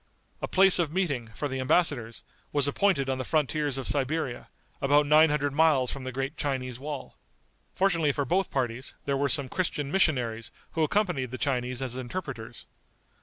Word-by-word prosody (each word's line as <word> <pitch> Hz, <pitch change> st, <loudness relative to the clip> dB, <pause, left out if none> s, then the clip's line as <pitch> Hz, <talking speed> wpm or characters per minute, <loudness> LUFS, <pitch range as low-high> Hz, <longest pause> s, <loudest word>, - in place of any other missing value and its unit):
A -, -, -2 dB
place 190 Hz, -1 st, +5 dB
of 165 Hz, -4 st, 0 dB
meeting, 150 Hz, -10 st, -1 dB
for 145 Hz, -, -2 dB
the 130 Hz, -1 st, -4 dB
embassadors, 130 Hz, -5 st, +1 dB, 0.3 s
was 145 Hz, -1 st, +2 dB
appointed 145 Hz, -2 st, +1 dB
on 130 Hz, -1 st, -1 dB
the -, -, -2 dB
frontiers 150 Hz, -1 st, 0 dB
of 135 Hz, -, -4 dB
Siberia, 140 Hz, -2 st, -1 dB, 0.3 s
about 145 Hz, +2 st, +4 dB
nine 155 Hz, +2 st, +6 dB
hundred 145 Hz, -1 st, 0 dB
miles 145 Hz, -5 st, +3 dB
from 135 Hz, -2 st, -6 dB
the 130 Hz, -, -4 dB
great 135 Hz, +4 st, -4 dB
Chinese 130 Hz, -3 st, -3 dB
wall. 145 Hz, 0 st, -7 dB, 0.6 s
Fortunately 170 Hz, -6 st, +2 dB
for 140 Hz, 0 st, -2 dB
both 185 Hz, +7 st, +1 dB
parties, 125 Hz, -1 st, -3 dB
there 140 Hz, -, 0 dB
were 140 Hz, +1 st, +1 dB
some 140 Hz, 0 st, +3 dB
Christian 150 Hz, -4 st, -2 dB
missionaries 125 Hz, -, +1 dB, 0.2 s
who 165 Hz, -, -2 dB
accompanied 155 Hz, -, 0 dB
the 130 Hz, -, -6 dB
Chinese 125 Hz, -2 st, -1 dB
as 125 Hz, -1 st, -4 dB
interpreters. 125 Hz, -4 st, -6 dB
140 Hz, 170 wpm, -27 LUFS, 130-155 Hz, 0.6 s, nine